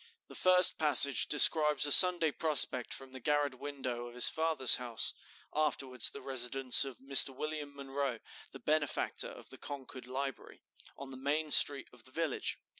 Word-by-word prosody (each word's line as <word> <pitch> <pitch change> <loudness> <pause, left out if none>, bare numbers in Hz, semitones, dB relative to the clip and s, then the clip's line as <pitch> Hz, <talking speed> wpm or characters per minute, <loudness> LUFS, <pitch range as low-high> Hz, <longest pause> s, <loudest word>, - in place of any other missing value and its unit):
The - - -15
first 185 -1 +3
passage 145 -3 +3
describes 150 -1 +3
a 145 - -1
Sunday 175 -2 +6
prospect 140 -5 -2
from 135 -1 -10
the 130 - -12
garret 145 -1 -4
window 130 -4 -9
of 120 - -16
his 125 - +1
father's 160 -5 0
house, 120 -2 -4 0.4
(afterwards 135 -5 -1
the - - -13
residence 130 0 +2
of 135 -3 -11
Mr. 135 0 +3
William 150 -1 -9
Munroe, 140 -2 -7 0.3
the - - -13
benefactor 150 -2 -4
of - - -16
the - - -14
Concord 130 -3 -12
Library), 135 0 -10 0.3
on 135 -1 -12
the 130 - -12
main 150 +3 -5
street 140 -2 +4
of 120 -2 -19
the - - -12
village. 160 -2 -6
140 Hz, 165 wpm, -29 LUFS, 130-150 Hz, 0.4 s, Sunday